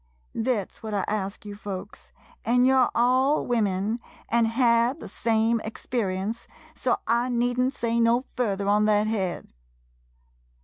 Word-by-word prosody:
Thet 225 -4 -1
's - - -19
what 215 -2 -4
I 200 - 0
ask 205 -1 -3
you 205 - -6
folks, 200 -2 -8 0.3
an' 245 +2 +3
you 265 - +4
're 260 -2 +4
all 260 +5 +3
women, 215 -1 0 0.3
an' 235 0 +3
had 235 +2 +2
the - - -9
same 225 0 +1
experience, 220 -1 -3 0.3
so 255 -5 0
I 235 +2 +1
need 245 0 0
n't 255 +1 +2
say 235 -1 0
no 235 +2 +3
further 200 -5 -1
on 210 +1 +3
thet 210 0 +3
head. 195 - -3
230 Hz, 150 wpm, -25 LUFS, 210-245 Hz, 0.3 s, you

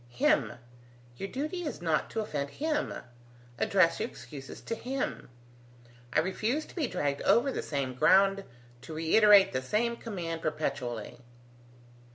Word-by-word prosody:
"Him! 120 - +2 0.6
Your 195 - -5
duty 305 - -3
is 305 -4 -4
not 165 -3 0
to 225 - -2
offend 145 -9 -3
him. 300 - -1 0.7
Address 185 -4 +3
your - - -2
excuses 135 +2 -10
to - - -4
him. 255 - -4 0.8
I 155 - +3
refuse 220 - -1
to - - -16
be 315 -7 0
dragged 140 -7 -2
over 265 +4 +3
the - - -3
same 140 -3 -3
ground, 195 +8 +4 0.4
to 155 +4 -8
reiterate 200 +5 +6
the 130 - 0
same 225 - 0
command 175 -8 -5
perpetually." 135 -8 -3
185 Hz, 140 wpm, -30 LUFS, 145-235 Hz, 0.8 s, reiterate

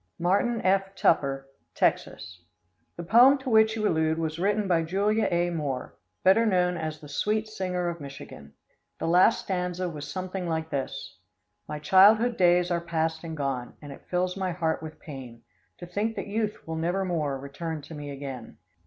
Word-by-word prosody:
Martin 200 +7 +1
F. 195 +1 +1
Tupper, 135 -6 +1 0.3
Texas. 90 -1 -1 0.6
The 170 - -5
poem 245 +10 +6
to 265 -2 -5
which 220 0 +5
you 215 -1 0
allude 160 -2 +1
was 160 0 -3
written 205 +2 +1
by 170 -3 +3
Julia 200 +6 +1
A. 175 0 +1
Moore, 145 -6 -4 0.3
better 195 +5 +5
known 180 -4 +2
as 155 -2 -4
the 150 - -12
Sweet 210 +9 -1
Singer 185 -4 -3
of 170 -2 -4
Michigan. 135 - -10 0.4
The - - -4
last 180 +7 +4
stanza 180 -1 -2
was 150 -4 -6
something 185 -1 -4
like 160 0 -2
this: 135 -6 -5 0.5
"My 150 - -4
childhood 205 +9 +5
days 180 -2 +3
are 170 -1 +1
past 160 -1 -2
and 160 -1 -6
gone, 135 -4 -3
And 145 -2 -10
it 140 - -13
fills 180 0 0
my 190 -2 -2
heart 165 -2 -1
with 155 -1 -9
pain, 130 -6 -10 0.3
To 175 - -8
think 205 +6 -2
that - - -4
youth 210 -1 -3
will 160 0 -3
nevermore 170 -4 -1
Return 150 +3 -6
to 150 - -10
me 145 -1 -7
again. 135 -3 -7
175 Hz, 175 wpm, -27 LUFS, 150-195 Hz, 0.6 s, poem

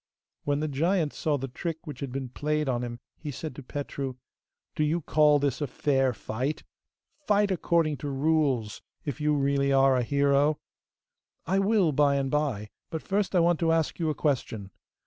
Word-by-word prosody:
When 145 0 +1
the 155 - 0
giant 160 +2 +1
saw 150 -2 0
the 135 0 -4
trick 165 +6 -5
which 145 -5 -7
had 140 -2 -4
been 130 -1 -4
played 150 +3 -1
on 125 -2 0
him 120 -1 -5 0.2
he 155 - -6
said 145 +1 -6
to 140 - -8
Petru. 140 -1 -5 0.6
'Do 155 - 0
you 160 +3 +1
call 150 -1 +4
this 140 -1 -1
a 145 - 0
fair 135 0 +1
fight? 125 +5 -3 0.6
Fight 205 -1 +3
according 165 -4 +1
to 145 +3 -5
rules, 135 -6 +1 0.2
if 150 0 -4
you 150 0 +2
really 140 0 +1
are 135 -1 +5
a 125 - +2
hero!' 140 +3 +2 0.9
'I 190 +3 +1
will 195 -4 +3
by 145 0 +3
and 135 -1 -1
by, 135 -9 -1 0.2
but 160 - -4
first 200 0 0
I 175 - +5
want 170 -1 +3
to 165 -1 +2
ask 165 0 0
you 165 -2 +1
a 155 - -1
question! 115 -9 -1
145 Hz, 185 wpm, -27 LUFS, 135-160 Hz, 0.9 s, are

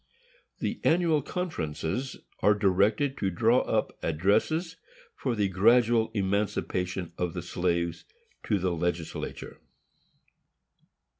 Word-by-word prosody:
The - - -3
Annual 165 -2 +3
Conferences 130 - -3 0.2
are 105 - +4
directed 105 +7 +2
to 95 - +1
draw 115 +7 +3
up - - -1
addresses, 105 - +1 0.4
for 125 -3 -2
the 105 -2 +1
gradual 115 +4 +4
emancipation 95 -3 -1
of 90 0 -2
the 90 - -4
slaves, 85 -1 -1 0.4
to 105 - +2
the 90 -1 0
legislature. 85 0 -4
100 Hz, 100 wpm, -28 LUFS, 90-120 Hz, 0.4 s, are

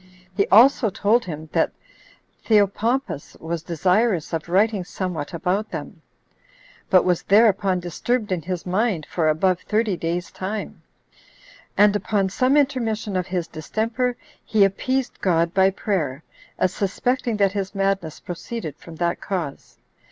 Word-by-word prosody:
He 200 0 +2
also 235 +1 +6
told 215 +5 +2
him, 155 -2 -6
that - - +1 0.7
"Theopompus 220 - +1
was 165 0 -4
desirous 180 +2 +1
of 165 0 -3
writing 200 +2 +2
somewhat 175 -5 -4
about 180 +5 -1
them, - - -7 0.9
but 185 -2 +5
was 180 -2 +2
thereupon 200 -3 +3
disturbed 210 +6 -2
in 180 -2 0
his 180 +1 -4
mind 185 -2 0
for 160 -3 0
above 180 +4 +2
thirty 215 -1 0
days' 170 +1 -3
time; 205 +3 -5 1.0
and 205 0 +5
upon 200 -2 0
some 255 +8 +2
intermission 225 -8 0
of 180 -1 -1
his 180 -2 -2
distemper, 230 +9 -2 0.3
he 215 -2 +3
appeased 255 +7 -2
God 170 -2 +2
[by 190 0 +5
prayer], 165 -8 -2 0.3
as 185 - +1
suspecting 235 +4 -1
that 200 -2 +3
his 200 0 -4
madness 195 -5 -1
proceeded 175 - -6
from 165 - -12
that 170 +1 -1
cause." 170 -8 -5
195 Hz, 135 wpm, -23 LUFS, 175-220 Hz, 1.0 s, also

